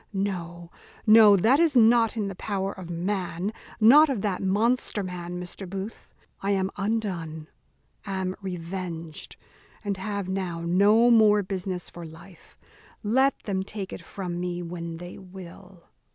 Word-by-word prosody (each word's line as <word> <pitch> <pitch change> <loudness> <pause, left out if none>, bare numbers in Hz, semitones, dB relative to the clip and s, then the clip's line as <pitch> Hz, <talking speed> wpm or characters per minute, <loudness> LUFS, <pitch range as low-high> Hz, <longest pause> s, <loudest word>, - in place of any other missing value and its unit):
no, 175 -3 -4 0.3
no 215 -2 +8
that 235 - +4
is 330 -4 +3
not 230 -1 +5
in 210 -2 -1
the 195 - -4
power 195 0 -3
of 185 -3 -10
man 180 +2 -2 0.3
not 285 +8 +7
of 240 -8 -2
that 200 -4 -1
monster 210 +2 +1
man, 180 -1 -5
Mr. 180 +1 -7
Booth. 195 +3 -7 0.3
I 195 - -2
am 195 -1 +1
undone, 185 -7 -3 0.5
am 190 -2 -3
revenged, 175 -3 -6 0.5
and 200 -2 -2
have 200 0 -3
now 185 -3 -3
no 205 +7 +4
more 210 -2 +5
business 185 -1 -4
for 175 - -10
life; 160 +2 -14 0.5
let 260 +6 +3
them 195 -2 -1
take 195 0 -6
it - - -7
from 180 -3 -5
me 175 0 -3
when 170 -1 -6
they 175 +1 -9
will." 185 -1 -12
190 Hz, 145 wpm, -26 LUFS, 175-210 Hz, 0.5 s, no